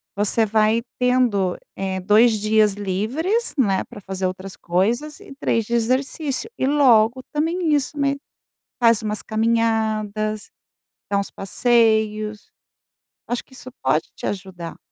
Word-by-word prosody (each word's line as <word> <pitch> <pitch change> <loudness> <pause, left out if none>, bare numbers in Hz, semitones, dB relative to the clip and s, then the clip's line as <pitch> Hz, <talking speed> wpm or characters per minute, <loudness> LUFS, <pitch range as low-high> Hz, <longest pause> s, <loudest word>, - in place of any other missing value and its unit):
você 210 +3 +2
vai 220 +1 +2 0.2
tendo, 245 -7 +2 0.2
eh, 190 -1 -3
2 215 +4 +4
dias 215 0 +3
livres, 225 - -1
né, 200 -8 +2
para 240 - -10
fazer 190 -1 -4
outras 185 +1 -5
coisas 230 - -1
e - - -12
3 225 -2 0
de 235 - -5
exercício, 265 - 0
e - - 0
logo 260 -4 +4
também 325 +2 0
isso 290 +1 0
me 280 -1 +1 0.6
faz 230 -3 +4
umas 215 -1 -2
caminhadas, 220 -2 0 0.6
dá 200 - +2
uns 200 - -3
passeios, 215 -1 +1 0.8
acho 245 0 -2
que - - -28
isso 255 0 -10
pode 155 +5 +1
te - - -12
ajudar. 180 -4 -6
220 Hz, 135 wpm, -22 LUFS, 205-250 Hz, 0.8 s, 2